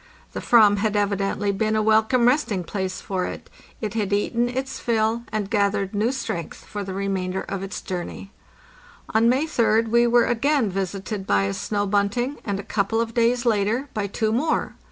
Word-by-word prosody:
The -, -, -3 dB
/yvam 215 Hz, -4 st, +5 dB
had 210 Hz, 0 st, 0 dB
evidently 200 Hz, 0 st, 0 dB
been 215 Hz, +2 st, 0 dB
a 215 Hz, -, +2 dB
welcome 220 Hz, +3 st, +3 dB
resting 245 Hz, -, +1 dB
place 190 Hz, +1 st, -3 dB
for 185 Hz, -2 st, -2 dB
it; -, -, -8 dB, 0.3 s
it 215 Hz, -3 st, -3 dB
had 210 Hz, -3 st, -1 dB
eaten 235 Hz, +4 st, +1 dB
its 265 Hz, +2 st, -4 dB
fill, 225 Hz, 0 st, +1 dB
and 215 Hz, -2 st, -2 dB
gathered 200 Hz, -1 st, 0 dB
new 215 Hz, +4 st, +1 dB
strength 175 Hz, -, -5 dB
for 205 Hz, -1 st, -5 dB
the 190 Hz, -1 st, -6 dB
remainder 190 Hz, -1 st, -2 dB
of 195 Hz, -1 st, -5 dB
its 195 Hz, +1 st, -5 dB
journey. 185 Hz, +1 st, -6 dB, 0.8 s
On 225 Hz, +1 st, +4 dB
May 265 Hz, +5 st, +2 dB
3d 230 Hz, -6 st, +2 dB
we 235 Hz, +1 st, +4 dB
were 240 Hz, 0 st, +4 dB
again 245 Hz, -2 st, +1 dB
visited 195 Hz, +1 st, -4 dB
by 100 Hz, -1 st, +3 dB
a 100 Hz, 0 st, -1 dB
snow 205 Hz, -, -2 dB
bunting, 205 Hz, +7 st, 0 dB
and 200 Hz, -2 st, -2 dB
a -, -, -5 dB
couple 210 Hz, +1 st, 0 dB
of 230 Hz, 0 st, -1 dB
days 235 Hz, +1 st, +2 dB
later 225 Hz, +5 st, +1 dB
by 205 Hz, -2 st, -2 dB
two 215 Hz, +2 st, -1 dB
more. 295 Hz, +8 st, 0 dB
215 Hz, 185 wpm, -23 LUFS, 195-235 Hz, 0.8 s, yvam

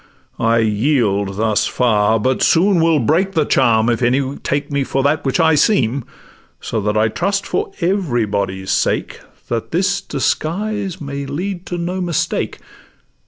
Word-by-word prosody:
I 115 Hz, 0 st, +2 dB
yield 105 Hz, -3 st, +1 dB
thus 110 Hz, -1 st, +1 dB
far; 110 Hz, -2 st, +2 dB
but 130 Hz, +4 st, 0 dB
soon 180 Hz, +1 st, +3 dB
will 165 Hz, -1 st, +3 dB
break 170 Hz, -, +1 dB
the 160 Hz, -4 st, +2 dB
charm 110 Hz, -4 st, +3 dB
If 120 Hz, 0 st, 0 dB
any 130 Hz, +3 st, +1 dB
take 145 Hz, +1 st, -3 dB
me 140 Hz, -1 st, 0 dB
for 135 Hz, 0 st, -1 dB
that 150 Hz, +3 st, +1 dB
which 135 Hz, +4 st, 0 dB
I 160 Hz, -1 st, +4 dB
seem: 140 Hz, -, +2 dB, 0.5 s
So 110 Hz, -, -3 dB
that 105 Hz, +1 st, -1 dB
I 110 Hz, +1 st, +3 dB
trust 200 Hz, -, -1 dB
for 420 Hz, 0 st, -2 dB
everybody's 105 Hz, -, -1 dB
sake, -, -, 0 dB, 0.3 s
That 115 Hz, -1 st, -3 dB
this 190 Hz, +4 st, 0 dB
disguise 190 Hz, +7 st, -2 dB
may 140 Hz, -2 st, -5 dB
lead 175 Hz, +5 st, -4 dB
to 175 Hz, -, -4 dB
no 180 Hz, +2 st, -3 dB
mistake. 175 Hz, -4 st, -1 dB
140 Hz, 155 wpm, -18 LUFS, 115-175 Hz, 0.5 s, I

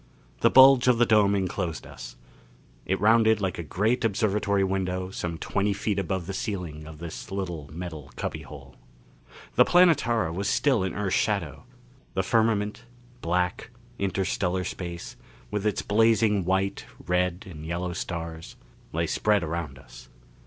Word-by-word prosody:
The -, -, +5 dB
bulge 130 Hz, -1 st, +7 dB
of 125 Hz, -2 st, +5 dB
the 120 Hz, -, +4 dB
dome 105 Hz, -3 st, +4 dB
enclosed 90 Hz, -3 st, -2 dB
us; -, -, -10 dB, 0.7 s
it 95 Hz, 0 st, 0 dB
rounded 110 Hz, +1 st, +4 dB
like 95 Hz, -4 st, -2 dB
a -, -, -3 dB
great 110 Hz, -, 0 dB
observatory 100 Hz, -2 st, +1 dB
window 95 Hz, -1 st, -2 dB
some 85 Hz, -3 st, -4 dB
twenty 100 Hz, +4 st, 0 dB
feet 100 Hz, 0 st, -1 dB
above 95 Hz, -1 st, -2 dB
the 95 Hz, -, -5 dB
ceiling 90 Hz, -7 st, -4 dB
of 80 Hz, -1 st, -10 dB
this 85 Hz, 0 st, -8 dB
little 90 Hz, -7 st, -4 dB
metal 80 Hz, -4 st, -7 dB
cubbyhole. 70 Hz, -3 st, -7 dB, 0.8 s
The -, -, +6 dB
Planetara 120 Hz, -, +3 dB
was 100 Hz, +3 st, -2 dB
still 130 Hz, -9 st, +2 dB
in 95 Hz, -, -3 dB
Earth's 100 Hz, -2 st, 0 dB
shadow. -, -, -1 dB, 0.5 s
The -, -, +1 dB
firmament 110 Hz, 0 st, +1 dB, 0.4 s
black, 90 Hz, +1 st, -1 dB, 0.3 s
interstellar 95 Hz, -1 st, -1 dB
space 85 Hz, -1 st, -6 dB, 0.3 s
with 105 Hz, 0 st, -1 dB
its 105 Hz, -, -1 dB
blazing 110 Hz, -2 st, +3 dB
white, 95 Hz, +2 st, -1 dB, 0.2 s
red 90 Hz, +1 st, 0 dB
and 80 Hz, -5 st, -9 dB
yellow 85 Hz, +2 st, -3 dB
stars 85 Hz, -2 st, -6 dB, 0.4 s
lay 85 Hz, +1 st, 0 dB
spread 105 Hz, +4 st, +1 dB
around 80 Hz, -4 st, -4 dB
us. -, -, -14 dB
95 Hz, 145 wpm, -26 LUFS, 85-105 Hz, 0.8 s, bulge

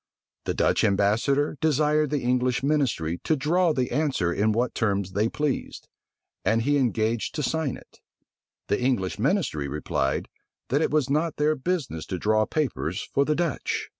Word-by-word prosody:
The -, -, -1 dB
Dutch -, -, +2 dB
ambassador 115 Hz, +10 st, +2 dB
desired 150 Hz, -1 st, +2 dB
the 145 Hz, -1 st, -1 dB
English 125 Hz, +1 st, +1 dB
ministry 130 Hz, -, 0 dB
to 160 Hz, -, +2 dB
draw 165 Hz, +5 st, +2 dB
the 130 Hz, -4 st, -1 dB
answer 130 Hz, -, 0 dB
in 105 Hz, +4 st, +2 dB
what 120 Hz, +3 st, 0 dB
terms 100 Hz, -4 st, 0 dB
they 105 Hz, +4 st, +1 dB
pleased; 150 Hz, -1 st, -3 dB, 0.6 s
and 115 Hz, +1 st, +2 dB
he 145 Hz, +3 st, +2 dB
engaged 115 Hz, -3 st, 0 dB
to 150 Hz, -, -2 dB
sign 160 Hz, -2 st, -1 dB
it: -, -, -19 dB, 0.7 s
the 105 Hz, -, 0 dB
English 115 Hz, -7 st, 0 dB
ministry 135 Hz, -, 0 dB
replied, 70 Hz, -1 st, -1 dB, 0.4 s
that 140 Hz, +4 st, +2 dB
it -, -, +2 dB
was 150 Hz, -4 st, +1 dB
not 155 Hz, +3 st, 0 dB
their 150 Hz, +1 st, +2 dB
business 140 Hz, -, -3 dB
to 95 Hz, -, -3 dB
draw 110 Hz, +3 st, +2 dB
papers 120 Hz, -, -2 dB
for 140 Hz, -, +3 dB
the 150 Hz, -, +1 dB
Dutch. 170 Hz, -3 st, -2 dB
130 Hz, 165 wpm, -25 LUFS, 105-150 Hz, 0.7 s, for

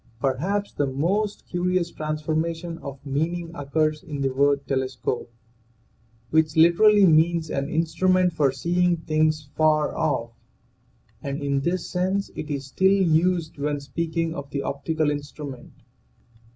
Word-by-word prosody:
Perhaps 175 Hz, +11 st, -1 dB
the 145 Hz, -, 0 dB
most 190 Hz, +10 st, -1 dB
curious 180 Hz, -1 st, 0 dB
transformation 160 Hz, +2 st, -3 dB
of 140 Hz, -2 st, -7 dB
meaning 165 Hz, +5 st, -2 dB
occurs 155 Hz, +1 st, -1 dB
in 145 Hz, -2 st, -6 dB
the 135 Hz, -1 st, 0 dB
word 140 Hz, +1 st, +2 dB
telescope, 130 Hz, -3 st, -2 dB, 1.0 s
which 155 Hz, -1 st, +2 dB
literally 200 Hz, +5 st, +6 dB
means 165 Hz, -1 st, +3 dB
an 140 Hz, +1 st, -2 dB
in 160 Hz, +2 st, +1 dB
strument 185 Hz, +2 st, +2 dB
for 145 Hz, -4 st, +2 dB
seeing 175 Hz, +5 st, +1 dB
things 155 Hz, -1 st, 0 dB
afar 155 Hz, -1 st, +2 dB
off, 130 Hz, -7 st, -1 dB, 0.9 s
and 140 Hz, +1 st, -4 dB
in 140 Hz, -1 st, +1 dB
this 170 Hz, +5 st, -1 dB
sense 190 Hz, +2 st, -1 dB
it 155 Hz, -, -6 dB
is 140 Hz, -2 st, -3 dB
still 190 Hz, +8 st, +2 dB
used 170 Hz, -3 st, +2 dB
when 145 Hz, 0 st, -1 dB
speaking 165 Hz, +3 st, -2 dB
of 140 Hz, -3 st, -7 dB
the 140 Hz, -1 st, -3 dB
optical^ 150 Hz, +2 st, -1 dB
instrument. 145 Hz, -3 st, -7 dB
155 Hz, 135 wpm, -24 LUFS, 140-170 Hz, 1.0 s, literally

